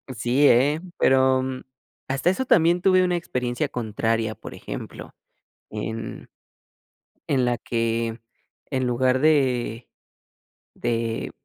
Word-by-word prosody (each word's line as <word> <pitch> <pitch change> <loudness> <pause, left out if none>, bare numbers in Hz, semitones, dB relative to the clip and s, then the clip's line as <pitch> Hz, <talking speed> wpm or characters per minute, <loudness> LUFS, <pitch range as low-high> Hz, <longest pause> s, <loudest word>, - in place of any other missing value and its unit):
Sí, 125 +6 +3
¿eh?, 140 +6 +4 0.2
pero, 130 0 +3 0.6
hasta 135 +6 +1
eso 260 +8 -1
también 170 -3 +4
tuve 185 -1 +4
una 180 -1 +1
experiencia 125 -2 -2
contraria, 115 -2 -2
por - - -10
ejemplo, - - -8 0.6
en 110 +1 -6 1.0
en 130 -3 +2
la 120 -1 +1
que 115 -1 -2 0.5
en 130 -2 0
lugar 130 +1 +2
de 130 -6 +1 0.8
de 115 -1 -2
125 Hz, 105 wpm, -24 LUFS, 115-145 Hz, 1.0 s, eh